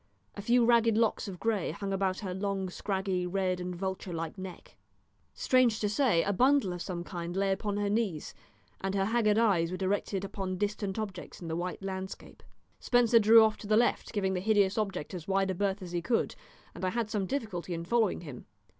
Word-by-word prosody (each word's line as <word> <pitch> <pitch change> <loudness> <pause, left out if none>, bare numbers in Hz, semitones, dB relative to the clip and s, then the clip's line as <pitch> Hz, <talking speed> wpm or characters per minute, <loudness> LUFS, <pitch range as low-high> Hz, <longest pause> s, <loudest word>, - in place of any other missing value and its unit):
A - - -7
few 235 +3 +3
ragged 230 -2 +4
locks 225 -2 +1
of 185 -3 -7
grey 220 -5 0
hung 195 +5 -4
about 190 -1 0
her 190 -3 -4
long, 195 -1 -2
scraggy, 190 -2 -2
red, 185 0 0
and 180 0 -4
vulture 190 0 -4
like 165 -1 -4
neck. 185 -2 -9 0.6
Strange 250 -4 +3
to 210 - 0
say, 210 - +2
a 200 - 0
bundle 255 -3 +3
of 175 - -6
some 175 -2 -4
kind 175 -1 -5
lay 195 0 +2
upon 205 +1 -1
her 205 0 0
knees, 200 -7 -1 0.5
and 195 +1 -2
her 195 -1 +2
haggard 215 -1 +2
eyes 195 -8 +3
were 185 - -4
directed 195 0 -1
upon 190 -2 -4
distant 205 0 -2
objects 200 -5 -6
in 170 - -7
the 160 - -2
white 180 +3 -4
landscape. 190 0 -6 0.4
Spencer 240 -2 +4
drew 225 +1 +8
off 220 -1 +2
to 205 - -9
the 215 +1 +4
left, 240 +1 +1
giving 190 -3 0
the 185 - -1
hideous 205 -1 +3
object 195 -7 -3
as 175 -3 -7
wide 195 0 +1
a - - -1
berth 195 +1 -1
as 175 - -8
he 175 -1 -1
could, 225 +7 0 0.4
and - - -9
I 185 - +2
had 225 +1 -2
some 200 -4 -1
difficulty 185 -10 -3
in 165 0 -5
following 225 -1 +1
him. 145 -8 -9
195 Hz, 210 wpm, -30 LUFS, 185-215 Hz, 0.6 s, drew